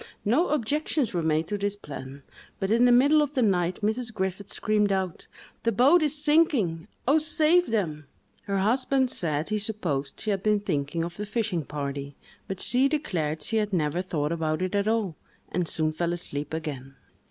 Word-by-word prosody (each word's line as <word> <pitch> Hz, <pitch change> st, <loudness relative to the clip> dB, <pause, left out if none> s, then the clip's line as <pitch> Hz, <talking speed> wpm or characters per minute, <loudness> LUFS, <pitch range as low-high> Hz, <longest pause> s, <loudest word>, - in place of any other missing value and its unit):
No 255 Hz, -, +3 dB
objections 295 Hz, -1 st, 0 dB
were 175 Hz, -, 0 dB
made 160 Hz, 0 st, +1 dB
to 205 Hz, +4 st, -3 dB
this 200 Hz, 0 st, -1 dB
plan; 140 Hz, -6 st, -9 dB, 0.4 s
but 195 Hz, +1 st, -1 dB
in 235 Hz, +2 st, +5 dB
the 245 Hz, -, +5 dB
middle 285 Hz, +5 st, +5 dB
of 295 Hz, 0 st, -2 dB
the 255 Hz, -, +3 dB
night, 180 Hz, -3 st, +1 dB
Mrs. 225 Hz, +2 st, -1 dB
Griffiths 190 Hz, -1 st, -3 dB
screamed 210 Hz, -1 st, +1 dB
out, 190 Hz, -3 st, -2 dB, 0.3 s
"The 230 Hz, -, +1 dB
boat 275 Hz, -, +5 dB
is 305 Hz, -1 st, +1 dB
sinking!—oh, 285 Hz, -, +2 dB
save 315 Hz, +3 st, +3 dB
them!" 155 Hz, -10 st, -2 dB, 0.4 s
Her 200 Hz, -1 st, -1 dB
husband 255 Hz, +5 st, +2 dB
said 155 Hz, -1 st, -1 dB
he 215 Hz, 0 st, 0 dB
supposed 175 Hz, -10 st, -2 dB
she 215 Hz, -, -1 dB
had 195 Hz, -2 st, -1 dB
been 210 Hz, +1 st, +2 dB
thinking 165 Hz, -3 st, -2 dB
of 170 Hz, +1 st, -6 dB
the 210 Hz, -, -4 dB
fishing 205 Hz, -6 st, -1 dB
party, 140 Hz, -1 st, -5 dB, 0.3 s
but 190 Hz, -1 st, -5 dB
she 255 Hz, +2 st, +4 dB
declared 160 Hz, -, -2 dB
she 225 Hz, -, +1 dB
had 210 Hz, -1 st, 0 dB
never 165 Hz, 0 st, 0 dB
thought 155 Hz, -5 st, -2 dB
about 160 Hz, 0 st, -1 dB
it 185 Hz, -, -2 dB
at 200 Hz, 0 st, +1 dB
all, 215 Hz, -7 st, 0 dB, 0.3 s
and 175 Hz, -1 st, -1 dB
soon 155 Hz, -1 st, 0 dB
fell 170 Hz, +2 st, -1 dB
asleep 150 Hz, -4 st, -4 dB
again. 140 Hz, -4 st, -5 dB
195 Hz, 185 wpm, -26 LUFS, 160-235 Hz, 0.4 s, in